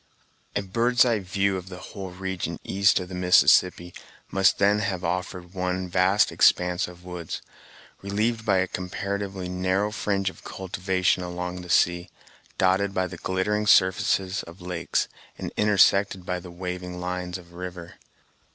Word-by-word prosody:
A 100 Hz, -, 0 dB
bird's 120 Hz, +6 st, +3 dB
eye 115 Hz, -3 st, +2 dB
view 95 Hz, 0 st, 0 dB
of 90 Hz, 0 st, -8 dB
the 90 Hz, -, -8 dB
whole 95 Hz, +2 st, -8 dB
region 95 Hz, 0 st, -4 dB
east 100 Hz, +1 st, +3 dB
of 90 Hz, -, -6 dB
the 90 Hz, -, -10 dB
Mississippi 90 Hz, 0 st, +4 dB, 0.4 s
must 95 Hz, -1 st, +4 dB
then 100 Hz, +1 st, +3 dB
have 95 Hz, -3 st, -2 dB
offered 90 Hz, +1 st, -3 dB
one 90 Hz, 0 st, -2 dB
vast 95 Hz, +3 st, +3 dB
expanse 90 Hz, +2 st, +3 dB
of 90 Hz, 0 st, -13 dB
woods, 90 Hz, -3 st, -5 dB, 0.6 s
relieved 110 Hz, +4 st, -1 dB
by 100 Hz, -3 st, +2 dB
a 95 Hz, 0 st, +2 dB
comparatively 95 Hz, +1 st, -4 dB
narrow 95 Hz, +3 st, 0 dB
fringe 100 Hz, -3 st, -1 dB
of -, -, -18 dB
cultivation 95 Hz, 0 st, -1 dB
along 90 Hz, 0 st, -5 dB
the 90 Hz, -, -11 dB
sea, 85 Hz, +1 st, +2 dB, 0.5 s
dotted 95 Hz, +1 st, +2 dB
by 95 Hz, -, +1 dB
the 90 Hz, 0 st, -7 dB
glittering 105 Hz, +4 st, -1 dB
surfaces 95 Hz, 0 st, +3 dB
of 85 Hz, +3 st, -13 dB
lakes, 90 Hz, -2 st, -2 dB, 0.3 s
and -, -, -6 dB
intersected 100 Hz, -2 st, +3 dB
by 90 Hz, -1 st, -2 dB
the 90 Hz, -, -11 dB
waving 90 Hz, 0 st, -6 dB
lines 90 Hz, 0 st, -3 dB
of 85 Hz, -1 st, -15 dB
river. 90 Hz, -1 st, -8 dB
95 Hz, 150 wpm, -25 LUFS, 90-100 Hz, 0.6 s, Mississippi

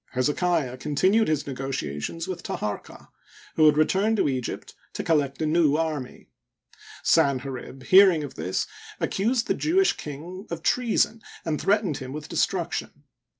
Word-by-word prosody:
Hezekiah 145 Hz, 0 st, 0 dB
continued 185 Hz, -, +2 dB
his 155 Hz, -2 st, 0 dB
negotiations 135 Hz, -, -4 dB
with 180 Hz, -2 st, -5 dB
Taharqa, 105 Hz, -9 st, -5 dB, 0.5 s
who 155 Hz, -1 st, +6 dB
had 150 Hz, -1 st, +4 dB
returned 195 Hz, +8 st, +2 dB
to -, -, +2 dB
Egypt 130 Hz, -3 st, -4 dB, 0.2 s
to -, -, -4 dB
collect 145 Hz, -4 st, +1 dB
a -, -, +1 dB
new 155 Hz, -2 st, +3 dB
army. 155 Hz, -5 st, -3 dB, 0.8 s
Sanherib. 135 Hz, -1 st, 0 dB
hearing 185 Hz, -5 st, +6 dB
of 140 Hz, -2 st, -7 dB
this, 95 Hz, -, -2 dB, 0.3 s
accused 230 Hz, +4 st, 0 dB
the -, -, +1 dB
Jewish 375 Hz, +5 st, +2 dB
king 170 Hz, +7 st, -8 dB
of 170 Hz, -1 st, -5 dB
treason 230 Hz, 0 st, +1 dB, 0.2 s
and 155 Hz, -2 st, -1 dB
threatened 200 Hz, -7 st, +1 dB
him 130 Hz, 0 st, -7 dB
with 150 Hz, +1 st, -7 dB
de -, -, -7 dB
struction. 170 Hz, -5 st, -1 dB
155 Hz, 145 wpm, -25 LUFS, 135-185 Hz, 0.8 s, who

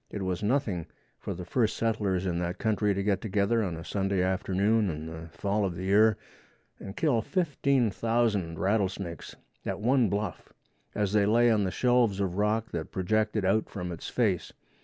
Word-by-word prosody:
It 100 Hz, -, -5 dB
was 95 Hz, 0 st, -2 dB
nothing 105 Hz, -, 0 dB, 0.3 s
for -, -, -5 dB
the 90 Hz, +1 st, -7 dB
first 110 Hz, +4 st, 0 dB
settlers 105 Hz, -5 st, 0 dB
in 85 Hz, -2 st, -1 dB
that 90 Hz, +2 st, -3 dB
country 105 Hz, -2 st, +1 dB
to 100 Hz, -, -1 dB
get 100 Hz, -1 st, +1 dB
together 105 Hz, +2 st, +1 dB
of 90 Hz, -6 st, -2 dB
a 80 Hz, -, -8 dB
Sunday 95 Hz, -1 st, 0 dB
afternoon 100 Hz, +3 st, +1 dB
in 80 Hz, -1 st, -5 dB
the 80 Hz, 0 st, -8 dB
fall 100 Hz, +4 st, -1 dB
of 95 Hz, -3 st, -1 dB
the 90 Hz, -, -5 dB
year 105 Hz, +2 st, +4 dB, 0.6 s
and 95 Hz, +1 st, -9 dB
kill 140 Hz, -8 st, +2 dB
15,000 115 Hz, -, 0 dB
rattle 100 Hz, +1 st, +2 dB
snakes 90 Hz, -4 st, -7 dB, 0.3 s
at -, -, -3 dB
one 120 Hz, 0 st, +3 dB
bluff 100 Hz, -2 st, -3 dB, 0.4 s
as 105 Hz, -1 st, 0 dB
they 100 Hz, -1 st, +3 dB
lay 120 Hz, +2 st, +4 dB
on 105 Hz, -3 st, +2 dB
the -, -, 0 dB
shelves 120 Hz, -2 st, +2 dB
of 95 Hz, -1 st, -1 dB
rock 110 Hz, +2 st, 0 dB
that 80 Hz, -2 st, -4 dB
projected 105 Hz, +2 st, 0 dB
out 105 Hz, +3 st, +2 dB
from 90 Hz, -3 st, -5 dB
its 85 Hz, -, -6 dB
face. 100 Hz, -8 st, 0 dB
100 Hz, 180 wpm, -28 LUFS, 95-110 Hz, 0.6 s, year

